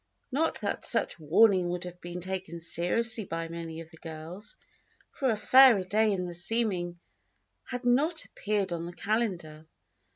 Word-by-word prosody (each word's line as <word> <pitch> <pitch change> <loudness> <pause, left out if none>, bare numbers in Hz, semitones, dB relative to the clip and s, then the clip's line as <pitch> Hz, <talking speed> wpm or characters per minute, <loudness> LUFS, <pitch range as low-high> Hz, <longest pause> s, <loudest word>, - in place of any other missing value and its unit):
Not 315 +2 0
that 200 -1 -3
such 230 -6 +3
warning 180 +3 +4
would 175 +1 -3
have 180 0 -9
been 175 +1 -6
taken 185 -2 -5
seriously 215 +7 0
by 165 -2 -4
many 165 -1 -6
of 160 -1 -13
the 165 - -15
girls, 160 +5 -8 0.6
for 270 - -1
a 220 - +1
fairer 245 -1 +6
day 215 +3 +2
in 185 -2 -1
the 175 - -6
seeming 175 -2 -1 0.7
had 250 0 -6
not 300 +7 +2
appeared 200 -3 -2
on 170 0 -4
the 175 - -8
calendar. 175 -8 -2
185 Hz, 160 wpm, -29 LUFS, 170-225 Hz, 0.7 s, fairer